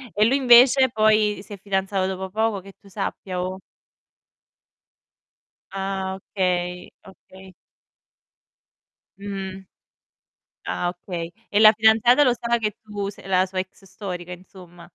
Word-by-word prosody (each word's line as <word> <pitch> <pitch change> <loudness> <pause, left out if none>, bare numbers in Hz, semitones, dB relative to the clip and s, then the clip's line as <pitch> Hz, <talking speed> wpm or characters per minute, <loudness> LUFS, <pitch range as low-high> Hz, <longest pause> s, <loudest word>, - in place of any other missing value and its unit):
E 210 - +4
lui 245 +5 +3
invece 260 0 +6
poi 215 -2 +2
si 205 - -11
è - - -8
fidanzato 195 -1 -1
dopo 190 0 -5
poco, 220 0 -1
che 195 +1 -14
tu 200 - -20
sappia 190 -2 -4
o 185 +1 -4 2.1
Ah, 190 -1 -3
okay, 180 -2 -3 0.2
okay. 190 0 -16 1.6
Mh-mh. 195 -1 -7 1.0
Ah, 175 - -2
okay. 175 -1 -6 0.2
E 205 - +2
la 215 0 +9
fidanzata 225 +5 +4
lo 250 - +4
sa 235 0 -1
che 215 -3 -3
tu 205 -2 -5
sei 205 - -13
la 185 -1 +2
sua 185 0 -5
ex 190 +1 -7
storica, 180 -2 -7
insomma? 180 -1 -14
195 Hz, 130 wpm, -23 LUFS, 185-215 Hz, 2.1 s, la